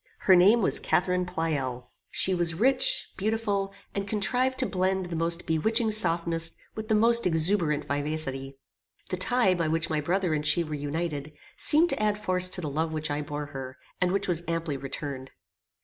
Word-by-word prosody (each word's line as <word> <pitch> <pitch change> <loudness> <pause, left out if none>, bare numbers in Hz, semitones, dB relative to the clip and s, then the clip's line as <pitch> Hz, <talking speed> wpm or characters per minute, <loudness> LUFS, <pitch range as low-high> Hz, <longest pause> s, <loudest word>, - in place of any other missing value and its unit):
Her 190 - +5
name 205 +6 +5
was - - +3
Catharine 180 0 0
Pleyel. 140 -8 -3 0.2
She 190 - +2
was 170 -2 0
rich, 255 +7 +2
beautiful, 200 -1 -1 0.2
and 200 0 -3
contrived 250 +6 0
to 260 - 0
blend 190 -2 -1
the 175 -1 -6
most 165 +1 -1
bewitching 220 +8 +1
softness 170 -4 +2 0.2
with 220 0 -7
the 220 - +2
most 230 0 +3
exuberant 160 -3 +1
vivacity. 140 -2 -4 0.5
The 185 - -1
tie 225 +1 +2
by 170 -3 -1
which 165 +1 -1
my 155 -1 0
brother 180 +2 -1
and 150 -1 -1
she 150 +3 +3
were 155 -2 -7
united, 150 0 -4 0.2
seemed 330 +4 +6
to - - -2
add 210 -1 +1
force 185 -3 0
to 180 - -3
the 155 - -4
love 160 +3 -2
which 155 -1 -3
I 145 +1 -2
bore 145 0 -5
her, 130 -1 -7 0.2
and 180 0 +2
which 200 +1 -1
was 170 -2 0
amply 165 -3 -2
returned. 135 -1 -6
170 Hz, 180 wpm, -27 LUFS, 150-200 Hz, 0.5 s, seemed